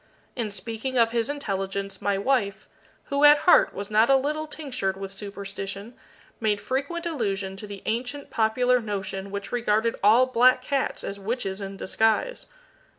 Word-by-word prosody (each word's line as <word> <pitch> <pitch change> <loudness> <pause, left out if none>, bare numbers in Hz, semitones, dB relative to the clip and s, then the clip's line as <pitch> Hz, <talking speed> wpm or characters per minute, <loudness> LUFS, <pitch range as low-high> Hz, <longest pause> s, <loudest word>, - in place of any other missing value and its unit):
In 230 -4 -2
speaking 225 +6 -4
of 230 -1 +4
his 235 +1 0
intelligence, 195 -7 -3
my 200 -1 +1
wife, 200 -3 0 0.4
who 280 +1 +1
at 295 0 +9
heart 360 - +6
was 200 +2 -6
not 220 +3 +4
a 270 - +7
little 300 +3 -1
tinctured 255 -11 -3
with 195 0 -6
superstition, 200 +2 -7 0.5
made 210 -2 +1
frequent 280 - -3
allusion 200 - -2
to 210 - -8
the 200 -2 -9
ancient 250 +5 -3
popular 245 +3 +2
notion 200 -3 -4
which 200 0 -6
regarded 230 -1 +1
all 225 +5 +6
black 255 0 +4
cats 275 0 -1
as 200 0 -5
witches 200 -2 -3
in 195 0 -6
disguise. 225 - 0
220 Hz, 155 wpm, -25 LUFS, 200-255 Hz, 0.5 s, at